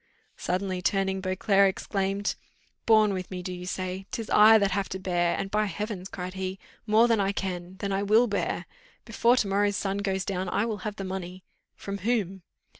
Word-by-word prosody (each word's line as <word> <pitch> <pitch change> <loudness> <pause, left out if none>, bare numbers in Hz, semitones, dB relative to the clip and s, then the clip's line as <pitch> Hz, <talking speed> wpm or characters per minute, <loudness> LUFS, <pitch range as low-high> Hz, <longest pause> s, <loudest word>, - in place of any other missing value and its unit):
Suddenly 185 0 -2
turning, 190 0 0
Beauclerc 195 +1 +3
exclaimed, 195 +1 -2 0.5
"Borne 215 -2 +5
with 185 -1 -4
me, 180 -1 -6
do 185 - -4
you 180 0 -7
say? 185 +1 -4
'Tis 225 -2 -5
I 220 +1 +8
that 200 -2 +1
have 200 +1 -1
to 190 - -4
bear 175 -2 0
and 195 - -4
by 215 0 +2
heavens!" 200 0 -5
cried 185 0 -6
he, 190 0 -4 0.3
"more 220 +3 +5
than 230 -2 +2
I 195 0 +1
can 185 -2 -5
than 200 0 -3
I 195 - 0
will 215 +4 +4
bear. 205 -4 -2 0.4
Before 240 +1 +3
to 210 - +1
morrow's 205 +1 +1
sun 195 0 -2
goes 195 -1 -1
down 185 -1 -2
I 205 - +1
will 220 -2 -2
have 205 - -12
the 195 - -5
money." 185 -1 -6 0.3
"From 200 0 -6
whom?" 195 -3 -1
195 Hz, 195 wpm, -27 LUFS, 185-205 Hz, 0.5 s, I